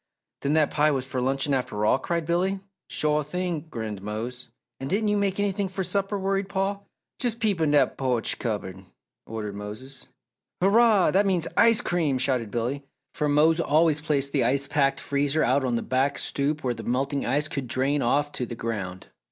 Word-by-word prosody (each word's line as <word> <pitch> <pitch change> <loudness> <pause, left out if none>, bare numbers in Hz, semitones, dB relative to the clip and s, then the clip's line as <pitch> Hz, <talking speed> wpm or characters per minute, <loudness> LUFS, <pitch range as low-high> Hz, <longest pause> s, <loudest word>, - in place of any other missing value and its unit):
"Then 140 - 0
that 155 -1 +3
pie 150 0 +3
was 135 -3 -1
for 130 -1 -3
luncheon 135 +2 0
after 125 -5 -1
all?" 130 - +3
cried 170 +2 -2
Billy. 185 +4 0 0.3
"Shore 150 0 0
thing!" 170 +1 -3
grinned 110 -7 -5
Mose. 115 +5 -5 0.3
"And 135 - -5
didn't 210 +3 +1
you 210 - +2
make 200 -1 0
anything 200 -1 0
for 190 +1 -3
supper?" 200 +2 -1
worried 195 0 -1
Paul. 200 +1 -2 0.3
"Jes' 240 -4 +1
peep 215 -7 0
in 155 - +3
dat 145 -3 +2
po'ch 125 -4 0
cupboard!" 95 -5 -4 0.4
ordered 105 -2 -5
Mose. 110 +7 -8 0.5
"Hurrah! 210 +1 +4
That 200 +2 +3
means 180 -4 +1
ice 230 -1 +5
cream," 160 -6 0
shouted 125 -4 0
Billy, 120 +5 -2 0.3
for 150 -1 -1
Mose 155 +3 +4
always 155 -1 +3
placed 140 -2 0
the 135 -3 +2
ice 140 +4 +3
packed 140 -1 +1
freezer 145 +2 +1
out 135 +3 +2
on 125 -2 0
the 115 - -1
back 135 +2 0
stoop 145 +2 -1
where 125 -2 0
the - - -8
melting 135 +3 -1
ice 145 +5 +1
could 140 -4 -4
drain 135 +4 +1
off 145 +4 +1
to 125 - -3
the 120 - -6
ground. 100 -6 -5
145 Hz, 190 wpm, -25 LUFS, 125-175 Hz, 0.5 s, ice